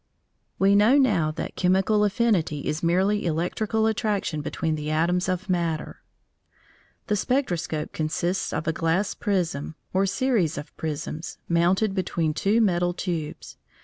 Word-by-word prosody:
We 195 +1 +4
know 215 +7 +5
now 205 - +3
that 155 - -5
chemical 190 +3 +2
affinity 205 - +1
is 155 - -2
merely 190 +5 +2
electrical 190 +7 0
attraction 210 -8 0
between 160 +2 -2
the 150 -1 -3
atoms 175 +4 +1
of 185 +1 -2
matter. 170 -4 -2 1.0
The 210 - 0
spectroscope 180 - -1
consists 170 +4 -1
of 155 - -3
a 160 - +2
glass 165 +5 0
prism, 165 -7 -2 0.2
or 195 +1 +2
series 205 - +1
of 145 - -8
prisms, 155 +1 -5
mounted 180 +5 +2
between 170 -4 -1
two 205 +8 +2
metal 175 -4 +1
tubes. 165 -5 -4
180 Hz, 135 wpm, -25 LUFS, 160-205 Hz, 1.0 s, know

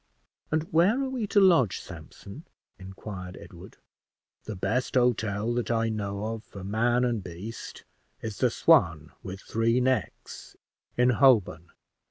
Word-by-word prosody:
"And 155 0 0
where 185 +10 +4
are 265 - -2
we 250 -5 -3
to 205 - +3
lodge, 170 - +4
Sampson?" 130 +11 -11 0.3
inquired 95 -1 -8
Edward. 90 +2 -13 0.7
"The 110 - -5
best 105 +9 -2
hotel 115 -3 +1
that 120 0 -2
I 115 -1 +1
know 100 -1 -3
of 110 -1 -8
for 100 - -11
man 120 +5 +1
and 115 -5 -1
beast 90 +7 -8 0.4
is 110 -4 -6
the - - +3
'Swan - - +3
with 95 +1 -8
Three 115 +2 +1
Necks,' 125 -4 -3 0.4
in 125 +1 +4
Holborn. 110 - +3
115 Hz, 140 wpm, -27 LUFS, 100-125 Hz, 0.7 s, where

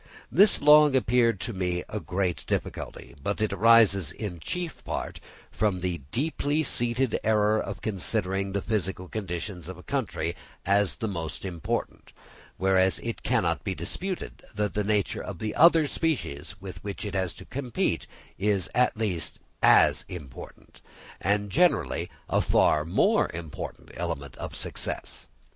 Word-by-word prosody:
This 200 0 +5
long 150 -1 +7
appeared 115 -4 +3
to 120 - -3
me 90 -2 -1
a 105 - -4
great 90 -4 -2
difficulty: - - -4
but 100 +8 -2
it 110 0 0
arises 105 -7 +5
in 90 -2 -5
chief 175 - -4
part - - -4 0.3
from 100 -4 0
the 90 -2 -2
deeply 145 - 0
seated 120 -2 +1
error 105 0 +3
of 100 -1 -6
considering 95 0 -1
the 100 0 -2
physical 95 -4 -2
conditions 90 -3 -5
of 95 -1 -7
a 90 - -13
country 85 +2 -2 0.3
as 100 -5 +3
the 110 - -3
most 85 -3 -5
important; 85 -5 -4 0.4
whereas 95 -2 +3
it - - -4
cannot - - +1
be - - -2
disputed 190 -1 -5
that 105 0 -1
the 105 - 0
nature 105 0 0
of 100 - -6
the 110 +3 -3
other 165 0 +6
species 100 - -2
with 95 -1 -9
which 100 +1 -5
each 105 - -4
has 95 -3 0
to - - -11
compete, 130 -3 -2 0.3
is 100 -2 +1
at 125 -3 +3
least 85 -8 -2 0.2
as - - +6
important, 75 -8 -10 0.4
and 100 +1 +1
generally 175 - +2 0.2
a - - +2
far 75 - +3
more 85 - +3
important 80 -3 -7
element 70 -2 -4
of - - -6
success. - - -3
100 Hz, 150 wpm, -27 LUFS, 90-115 Hz, 0.4 s, long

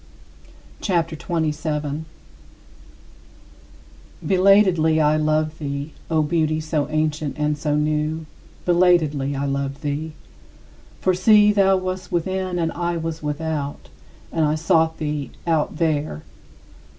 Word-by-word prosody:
CHAPTER 170 -4 0
XXVII 160 0 -1
38. 150 -1 -2 2.2
Belatedly 185 -4 +4
I 150 0 +3
loved 155 0 0
thee, 140 0 -4 0.2
O 160 -2 +2
Beauty 155 0 0
so 155 -2 -2
ancient 155 -2 -1
and 150 0 0
so 150 0 -1
new, 155 +1 -1 0.4
belatedly 165 -6 +3
I 140 +1 -2
loved 140 +1 -3
thee. 150 +2 -3 0.9
For 185 - +3
see, 210 +3 +5
thou 195 -1 +4
wast 185 0 -4
within 185 +1 -1
and 165 -1 0
I 175 0 -2
was 165 0 -4
without, 150 - -4 0.4
and 160 - 0
I 150 0 +2
sought 160 0 +2
thee 150 -2 -3 0.2
out 160 -2 0
there. 150 - -1
155 Hz, 115 wpm, -22 LUFS, 150-170 Hz, 2.2 s, see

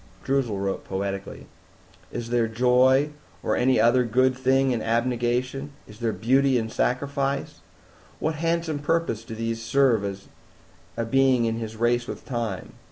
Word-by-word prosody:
Droozle 130 -6 0
wrote 95 0 -2
poetically, 100 0 -4 0.7
"Is 115 0 -5
there 120 -2 +2
Joy 125 +5 +3 0.3
or - - +1
any 130 +1 +3
other 125 +2 +4
good 130 +3 +2
thing 130 +1 +2
in 120 -3 -1
Abnegation? 125 +4 -1
Is 105 +1 -14
there 115 -2 0
Beauty 130 +4 +2
in 110 -1 -2
Sacrifice? 140 +2 -1 0.6
What 155 - -1
Handsome 165 -1 -1
purpose 145 -7 -1
do 115 0 -8
these 115 0 -3
serve 110 -6 +1 0.7
a 115 - -1
being 130 0 +3
in 115 0 -1
his 110 -1 -5
race 120 +1 +1
with - - -7
Time? 115 -6 -4
120 Hz, 145 wpm, -25 LUFS, 115-135 Hz, 0.7 s, other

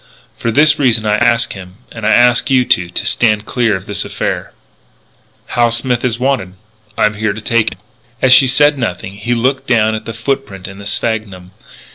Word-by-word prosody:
For 115 - -3
this 150 +5 +4
reason 120 -6 +1
I 105 0 +1
ask 120 +1 +1
him, 90 -1 -11 0.2
and 115 -2 -5
I - - +3
ask 120 +2 +4
you 130 -2 +3
too, 85 -5 +1
to 90 - -3
stand 110 -3 +1
clear 120 -5 0
of 95 0 -7
this 105 - -3
affair. - - -4 1.0
"Hal 120 -1 +2
Smith 120 +1 -1
is 120 -3 0
wanted. 125 -8 -2 0.4
I'm 105 0 +2
here 105 -1 -2
to 110 - -8
take 115 +1 0
him." - - -21 0.4
As 130 -1 +4
she 135 - +7
said 145 +2 +3
nothing, 95 -4 -4
he 120 +4 -2
looked 135 +3 -1
down 110 -3 +2
at 110 - -5
the 115 - -6
foot 135 +5 -2
print 95 -6 -10
in 95 +1 -11
the 100 - -8
sphagnum. 105 -5 -3
115 Hz, 200 wpm, -14 LUFS, 105-125 Hz, 1.0 s, she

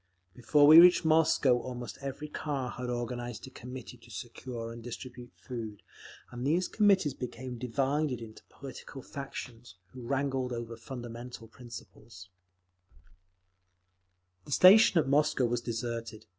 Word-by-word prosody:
Before 145 +6 +3
we 155 +3 +10
reached 175 0 +7
Moscow 155 -5 +4
almost 120 -3 -7
every 140 +2 -5
car 140 -4 -3
had 125 0 -5
organised 120 -1 -4
a 130 - -12
Committee 125 0 -9
to 120 +1 -19
secure 120 0 -7
and 115 - -10
distribute 125 +1 -8
food, 110 -5 -7 0.5
and 120 0 -6
these 165 +7 +1
Committees 195 - +3
became 125 0 -7
divided 135 +2 -1
into 110 -2 -11
political 135 0 -10
factions, 120 -6 -8 0.2
who 130 - -9
wrangled 130 0 -1
over 115 -1 -5
fundamental 120 -1 -8
principles…. 110 -5 -12 2.2
The - - -11
station 190 +5 +7
at 155 - +3
Moscow 145 -1 +2
was 120 0 -1
deserted. 115 -2 -5
125 Hz, 130 wpm, -30 LUFS, 120-140 Hz, 2.2 s, we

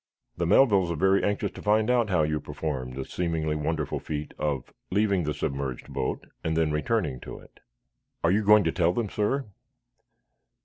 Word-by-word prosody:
"The 85 - -1
Melvilles 100 -3 +5
are 85 - -1
very 95 +5 +3
anxious 105 0 0
to - - -10
find 110 +1 +2
out 120 -3 +2
how 90 -5 +3
you 75 0 0
performed 65 -4 -4
the 65 - -4
seemingly 80 -3 -1
wonderful 75 0 -2
feat 75 -1 -5
of 70 -4 -2 0.2
leaving 100 -3 +2
the 75 - -1
submerged 70 -1 -4
boat 65 -1 -2 0.2
and 80 0 -1
then 80 -2 +2
returning 75 - 0
to - - -8
it." - - -17 0.6
"Are 85 - +4
you 105 +3 +2
going 105 0 +6
to 80 - +1
tell 85 0 +2
them, 110 0 -1
sir." 130 +6 0
85 Hz, 180 wpm, -27 LUFS, 75-105 Hz, 0.6 s, going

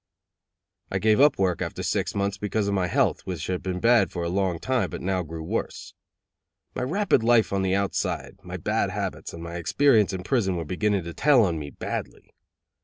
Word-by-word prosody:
I 95 - -1
gave 110 +5 +3
up 145 +1 +5
work 95 -3 0
after - - -4
six - - -1
months 100 0 -1
because 105 0 -1
of 100 - 0
my 95 -2 +1
health, - - +1
which 90 -4 -4
had 90 -1 -2
been 90 -1 -3
bad 115 -2 +4
for 85 - -4
a 85 - -1
long 95 -1 0
time, 125 0 0
but - - -6
now 95 0 -1
grew 80 -1 -7
worse. - - -4 0.8
My - - -4
rapid 180 - +2
life 115 -2 +3
on 100 - +1
the 95 0 +1
outside, 100 0 -2
my - - -7
bad - - 0
habits, - - -4
and 85 - -9
my 85 +1 -6
experience 110 - +3
in 95 -2 -5
prison 100 -5 +1
were 85 -1 -3
beginning 100 +3 0
to 85 0 -7
tell 140 - +4
on 85 -4 -1
me 70 -1 -6
badly. - - -6
95 Hz, 205 wpm, -25 LUFS, 90-110 Hz, 0.8 s, up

